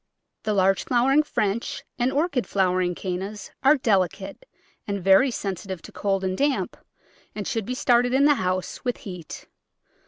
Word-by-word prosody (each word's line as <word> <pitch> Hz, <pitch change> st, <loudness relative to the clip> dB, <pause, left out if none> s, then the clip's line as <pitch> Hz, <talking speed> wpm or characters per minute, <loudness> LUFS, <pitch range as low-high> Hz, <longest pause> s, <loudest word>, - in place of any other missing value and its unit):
The 215 Hz, -, -1 dB
large 195 Hz, 0 st, +3 dB
flowering 265 Hz, +4 st, +3 dB
French 225 Hz, -7 st, -2 dB, 0.2 s
and 245 Hz, +2 st, +2 dB
Orchid 285 Hz, -3 st, 0 dB
flowered 185 Hz, -2 st, +1 dB
Cannas 195 Hz, +3 st, -5 dB
are 285 Hz, +3 st, +5 dB
delicate 200 Hz, -, -1 dB, 0.4 s
and 200 Hz, -1 st, -2 dB
very 195 Hz, +8 st, +5 dB
sensitive 190 Hz, -5 st, -5 dB
to -, -, -11 dB
cold 195 Hz, -1 st, -1 dB
and 185 Hz, 0 st, -1 dB
damp 280 Hz, +4 st, 0 dB, 0.6 s
and 205 Hz, -3 st, -4 dB
should 225 Hz, -3 st, -2 dB
be 250 Hz, -, -2 dB
started 245 Hz, -1 st, +3 dB
in 270 Hz, +2 st, +4 dB
the 295 Hz, -, +6 dB
house 185 Hz, 0 st, -2 dB
with 245 Hz, -1 st, -1 dB
heat. 180 Hz, -5 st, -8 dB
205 Hz, 155 wpm, -24 LUFS, 190-250 Hz, 0.6 s, the